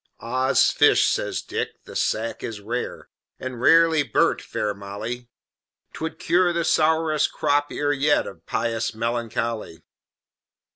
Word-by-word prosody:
"Oddsfish!" 130 +3 +3
says - - -1
Dick, - - -5
"the - - -12
sack 115 +1 -1
is 110 -2 -5
rare, 115 +5 -5 0.3
And 130 -2 -6
rarely 165 +2 +5
burnt, 145 - +1
fair 105 -1 -3
Molly; 105 +5 -7 0.6
'Twould 160 0 -5
cure 175 +1 +2
the 170 -1 -1
sourest 155 -1 +2
Crop 145 0 0
ear 145 0 0
yet 145 +1 +2
Of - - -11
Pious 115 -1 -1
Melancholy." 115 -5 -3
125 Hz, 125 wpm, -23 LUFS, 115-155 Hz, 0.6 s, rarely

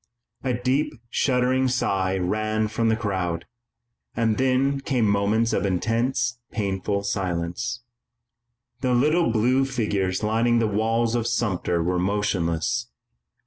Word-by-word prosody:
A 130 -2 0
deep 135 +5 0 0.2
shuddering 130 0 +2
sigh 95 -7 0
ran 110 +4 0
through 115 +1 0
the 110 - +3
crowd, 95 -6 -2 0.7
and 115 -1 +1
then 135 +1 +2
came 130 -5 0
moments 105 +3 +2
of - - +1
intense, 115 +5 0
painful 100 -1 -1
silence. 90 +2 -2 1.0
The 125 -1 +1
little 155 +6 +3
blue 125 +4 +3
figures 105 -7 -1
lining 115 +2 +2
the 115 - +2
walls 115 +2 +1
of 120 -1 0
Sumter 90 -6 0
were 90 +1 0
motionless. 100 +2 0
110 Hz, 120 wpm, -24 LUFS, 100-125 Hz, 1.0 s, the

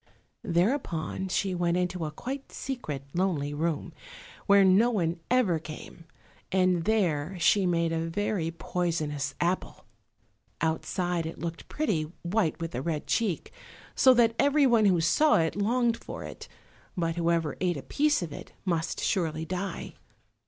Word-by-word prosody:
Thereupon 180 - 0
she 190 +1 0
went 175 -1 +1
into 180 -2 -1
a - - -2
quite 265 - -6
secret, 155 - -5
lonely 170 -6 0
room, 160 +2 -2 0.5
where 200 -1 +6
no 195 +6 +5
one 170 -7 0
ever 225 -10 +3
came, 155 +1 -10 0.5
and 185 -2 +2
there 185 -5 +1
she 185 +3 +4
made 170 -1 +1
a 165 0 -1
very 185 -2 -1
poisonous 165 -4 -2
apple. 175 +2 -2 0.7
Outside 170 +1 -1
it 160 - -7
looked 165 +1 -6
pretty, 165 - -1
white 175 -1 0
with 165 0 -4
a 125 - -2
red 155 0 -2
cheek, 210 -8 -1 0.4
so 260 - +6
that 230 -1 +4
everyone 275 -6 +4
who 180 -4 +4
saw 295 - +4
it 160 -1 +1
longed 230 +3 +1
for - - -8
it; - - -9 0.5
but 165 -2 0
whoever 165 -3 +1
ate 175 -3 +1
a 140 - -7
piece 295 -7 +1
of 160 -4 -6
it - - -10
must 170 -3 -1
surely 160 -4 0
die. 185 +3 -4
175 Hz, 145 wpm, -28 LUFS, 165-205 Hz, 0.7 s, where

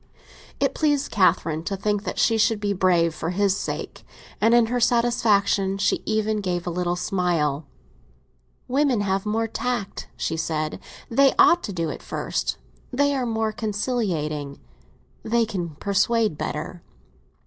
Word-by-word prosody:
It - - +1
pleased 290 -2 +1
Catherine 165 -5 +2
to 195 - -2
think 205 +1 -1
that - - -4
she 225 - +3
should 220 0 +2
be 205 -1 0
brave 175 -3 +2
for 160 +1 -4
his 195 +1 +1
sake, - - -5 0.4
and 225 +2 +5
in 240 -1 +5
her 245 +2 -1
satisfaction 215 -5 +2
she 200 - +1
even 215 -1 0
gave 180 -2 -2
a 175 - -2
little 175 0 -1
smile. 175 -6 0 1.0
"Women 265 -4 +2
have 195 0 -1
more 225 +2 0
tact," 240 -3 -3
she 160 - -2
said 155 -1 -2 0.3
"they 270 +3 +4
ought 345 - +6
to - - -5
do 165 -4 -2
it - - -8
first. - - -3 0.3
They 285 +2 +2
are 255 -2 -1
more 220 -1 0
conciliating; 195 - -2 0.6
they 230 +1 +1
can 175 -8 -4
persuade 205 +3 +1
better." 165 +4 -5
205 Hz, 150 wpm, -24 LUFS, 175-230 Hz, 1.0 s, ought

